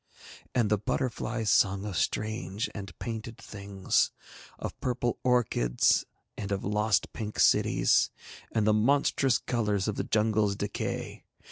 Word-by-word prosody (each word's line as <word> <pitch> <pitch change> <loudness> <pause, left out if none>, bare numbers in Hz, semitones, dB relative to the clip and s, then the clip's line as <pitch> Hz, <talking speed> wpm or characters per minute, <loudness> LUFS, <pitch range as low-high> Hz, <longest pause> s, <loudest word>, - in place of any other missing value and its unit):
And 115 -4 +2
the 105 - +3
butterflies 115 -1 -1
sung 100 +1 +3
of 100 -3 -4
strange 110 +2 -1
and 95 -6 -8
painted 115 -1 -5
things, 100 -2 -1 0.5
of - - -6
purple 120 -1 -1
orchids 115 - +2 0.3
and 100 -1 -5
of 100 - -1
lost 105 +1 +1
pink 105 -1 -5
cities - - +4 0.4
and 110 -2 +1
the 110 - +4
monstrous 135 +3 +3
colours 105 -5 -1
of 105 - -2
the - - 0
jungle's 105 -2 +1
decay. 105 0 -4
105 Hz, 130 wpm, -29 LUFS, 100-115 Hz, 0.5 s, cities